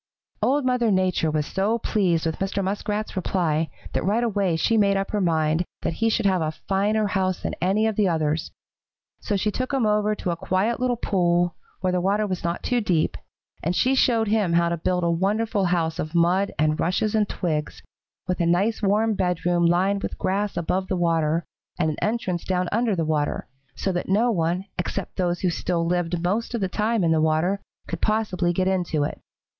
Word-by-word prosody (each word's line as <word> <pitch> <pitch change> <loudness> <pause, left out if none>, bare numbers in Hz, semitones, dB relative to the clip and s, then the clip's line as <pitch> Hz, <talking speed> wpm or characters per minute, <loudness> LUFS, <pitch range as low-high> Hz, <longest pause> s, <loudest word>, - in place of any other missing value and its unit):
"Old 280 +1 +2
Mother 250 -2 +2
Nature 185 -4 +2
was 150 -1 0
so 200 +7 0
pleased 185 -8 +1
with 160 -1 -2
Mr. 195 +1 -1
Muskrat's 205 +2 -2
reply 165 -4 0 0.2
that - - 0
right 215 +5 +1
away 200 -6 +1
she 225 +8 +1
made 200 -2 +3
up 195 0 -2
her 210 - 0
mind 160 -1 +2 0.2
that - - -1
he 225 - +4
should 225 -1 0
have 190 -3 +3
a 155 0 -1
finer 210 +3 +1
house 190 -2 -1
than - - -2
any 195 +5 +2
of 220 -1 0
the 205 -2 +2
others, 160 -2 0 0.7
so 210 - -2
she 210 +2 0
took 255 +5 -3
him 270 -4 +1
over 210 0 +2
to 180 - -2
a - - -1
quiet 190 +7 0
little 250 -1 +1
pool, 175 -5 +1 0.3
where 185 -1 0
the 180 - +1
water 200 +3 +1
was 185 -3 -3
not 170 0 -2
too 245 -1 +1
deep 175 -7 +1 0.5
and 175 +3 -1
she 260 +7 +3
showed 230 -4 +3
him 205 -5 +1
how 170 0 +3
to 170 - 0
build 180 +2 0
a 170 - +2
wonderful 200 +4 0
house 170 -2 0
of 155 +3 -4
mud 180 +4 +3
and 155 +1 +1
rushes 205 +5 0
and 215 -2 +2
twigs, 155 -4 -3 0.4
with 180 0 -1
a 170 - +2
nice 195 +7 +1
warm 215 +2 +2
bedroom 175 -2 +1
lined 190 +4 +2
with - - -4
grass 200 +2 -1
above 185 +2 -1
the 185 - -1
water, 165 -1 +1 0.3
and 160 -3 +1
an 150 - -6
entrance 205 -6 -1
down 185 -1 0
under 225 -1 +1
the 165 -2 -1
water, 150 -2 -1 0.3
so 195 - -1
that 175 0 -3
no 225 +5 +3
one 175 0 0
except 180 +1 -3
those 175 -1 0
who 180 - +1
still 170 0 -1
lived 175 0 -1
most 220 +7 -1
of 230 - -2
the 190 - +1
time 215 +2 0
in 165 - +3
the 160 -1 +3
water 160 +6 +1 0.3
could - - -5
possibly 200 -5 +1
get 185 +2 0
into 175 -5 0
it. - - -4
185 Hz, 205 wpm, -24 LUFS, 170-210 Hz, 0.7 s, he